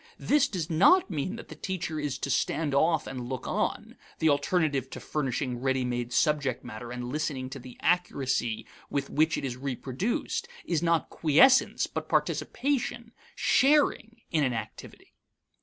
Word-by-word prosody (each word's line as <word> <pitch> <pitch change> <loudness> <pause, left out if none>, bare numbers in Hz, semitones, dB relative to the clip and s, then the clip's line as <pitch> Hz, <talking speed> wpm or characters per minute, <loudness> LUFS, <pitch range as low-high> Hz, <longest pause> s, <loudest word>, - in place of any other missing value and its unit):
This 295 0 +3
does 175 -6 -3
not 200 - +4
mean 165 +6 -2
that 230 - -10
the - - -8
teacher 175 -4 -4
is 145 -3 -2
to - - -3
stand 155 -3 0
off 160 +2 +3
and 125 -2 -6
look 130 -2 -4
on; - - -2 0.2
the 160 - +3
alternative 145 -2 +1
to - - -7
furnishing 130 -4 -2
ready 130 0 0
made 120 -1 -2
subject 145 -4 +1
matter 120 +3 -7
and 125 0 -5
listening 140 -3 -3
to 135 - -6
the 125 0 -12
accuracy 140 -9 0 0.2
with 140 -1 -2
which 155 +2 +2
it - - -3
is 125 -2 -4
reproduced 135 - -2 0.2
is 165 -3 0
not 170 -1 +1
quiescence, 250 - +4
but - - -6
participation, 240 -4 -1 0.2
sharing, 265 -5 +2
in 155 -3 +2
an 130 -2 +1
activity. 115 - -8
150 Hz, 155 wpm, -28 LUFS, 130-180 Hz, 0.2 s, not